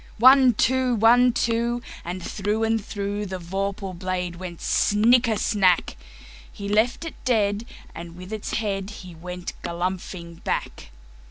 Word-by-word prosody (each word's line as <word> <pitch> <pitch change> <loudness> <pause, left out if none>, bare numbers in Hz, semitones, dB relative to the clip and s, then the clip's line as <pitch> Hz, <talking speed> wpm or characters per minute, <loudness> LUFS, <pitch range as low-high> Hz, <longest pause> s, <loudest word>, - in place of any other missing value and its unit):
One, 255 0 +7
two! 255 +1 +2
One, 240 +3 +5
two! 235 +1 0 0.2
And 175 +1 -5
through 210 +4 -1
and 225 0 +2
throughThe 200 -2 -4
vorpal 195 +2 -3
blade 180 -1 -3
went 175 -2 -7
snicker 230 +2 +3
snack! 185 - +2 0.6
He 200 - -7
left 220 +9 +1
it 325 - -9
dead, 215 -2 +1 0.3
and 170 0 -9
with 185 +4 -9
its 215 - -4
headHe 195 -4 -4
went 180 +1 -6
galumphing 175 -1 -5
back. 65 - -3
200 Hz, 125 wpm, -24 LUFS, 185-230 Hz, 0.6 s, One